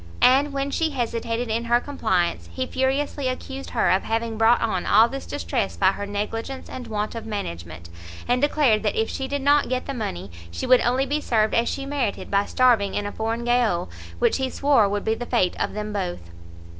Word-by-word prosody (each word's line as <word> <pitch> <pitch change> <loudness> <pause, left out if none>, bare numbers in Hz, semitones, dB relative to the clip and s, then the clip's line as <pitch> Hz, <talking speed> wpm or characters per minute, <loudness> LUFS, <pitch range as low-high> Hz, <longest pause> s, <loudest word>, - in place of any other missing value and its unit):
And, 275 +3 +5
when 275 0 -2
she 320 +2 +1
hesitated 235 -3 -2
in 230 +2 -1
her 240 +1 +3
compliance, 220 -11 -1
he 260 - -2
furiously 270 +1 -1
accused 265 +1 -5
her - - +2
of 190 - +3
having 225 0 -2
brought 225 +2 +4
on 215 -6 -1
all 220 +3 +6
this 275 +3 -7
distress 85 +1 -2
by 135 - +4
her 205 +1 -5
negligence 225 +6 -4
and 250 -2 -8
want 210 -1 -3
of 230 -1 -7
management, 85 - -6 0.4
and 250 +1 +2
declared 285 -7 +3
that 210 - -1
if 220 - 0
she 265 - -3
did 285 0 -3
not 285 -1 +3
get 255 0 -1
the 275 - -4
money, 95 - -5 0.2
she 85 0 -5
would 255 - +5
only 255 +3 +1
be 295 +2 -1
served 220 -5 +1
as 230 +1 +2
she 275 - -4
merited 275 -7 -2
by 200 0 +2
starving 235 -6 +3
in 205 - -1
a 205 - -3
foreign 225 +2 -3
gaol, 235 - +1 0.3
which - - +2
he 265 -1 -1
swore 270 -7 +3
would 205 0 -2
be 220 - +2
the 240 +2 -5
fate 190 -8 +1
of - - -1
them 210 0 -4
both. 175 - -4
230 Hz, 210 wpm, -24 LUFS, 205-265 Hz, 0.4 s, all